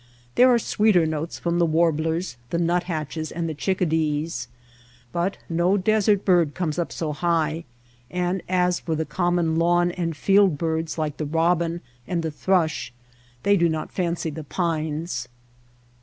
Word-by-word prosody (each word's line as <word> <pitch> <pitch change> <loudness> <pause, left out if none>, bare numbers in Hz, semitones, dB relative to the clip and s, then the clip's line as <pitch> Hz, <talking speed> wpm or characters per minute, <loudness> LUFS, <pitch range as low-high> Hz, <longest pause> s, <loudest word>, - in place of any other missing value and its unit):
There 255 - +6
are 240 - +5
sweeter 210 -6 +3
notes 160 +1 -3
from 170 0 -1
the 170 - +4
warblers, 160 -1 +1
the 170 - -1
nuthatches, 165 -2 -1
and 170 0 -3
the 160 - -3
chickadees. 160 -4 -1 0.6
But 175 +6 -1
no 175 +4 +2
desert 205 0 +2
bird 175 -6 +3
comes 175 -3 -2
up 170 - -2
so 155 -3 -3
high; 165 0 0 0.4
and 180 +1 -1
as 180 -1 +2
for 160 - -2
the 160 +1 -1
common 175 -2 0
lawn 175 +1 +3
and 165 -3 -3
field 195 -4 +4
birds 160 +1 -2
like 155 -2 -2
the 155 - -2
robin 170 +2 +1 0.3
and 170 -2 -1
the 160 - -2
thrush, 160 -5 0 0.5
they 200 0 +4
do 170 -3 +3
not 160 -1 -3
fancy 170 -3 -2
the 160 +1 -7
pines. 155 -4 -2
170 Hz, 155 wpm, -24 LUFS, 160-180 Hz, 0.6 s, There